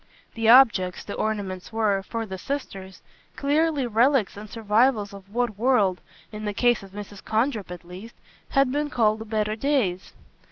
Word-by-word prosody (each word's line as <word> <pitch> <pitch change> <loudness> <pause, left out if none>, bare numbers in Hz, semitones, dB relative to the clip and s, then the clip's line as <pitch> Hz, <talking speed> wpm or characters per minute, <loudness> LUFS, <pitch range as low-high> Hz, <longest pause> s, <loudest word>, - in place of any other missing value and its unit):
The 225 -1 0
objects, 225 -8 +5
the 200 - -7
ornaments 200 -4 -3
were, 215 -3 +1
for 225 +3 -4
the 190 -3 -7
sisters, 195 -8 -6 0.3
clearly 295 0 +1
relics 240 0 +2
and 210 +1 -9
survivals 220 -1 +1
of 195 -1 -12
what 235 -3 -2
would, 215 -7 +2 0.3
in 210 0 -7
the 205 -1 -3
case 240 0 +2
of 195 - -12
Mrs. 205 0 -10
Condrip 220 -2 -1
at 180 -1 -9
least, 185 +6 -11 0.3
have 275 -2 +2
been 295 +2 -1
called 220 -3 0
better 215 -1 0
days. 220 -8 -1
215 Hz, 160 wpm, -25 LUFS, 200-245 Hz, 0.3 s, objects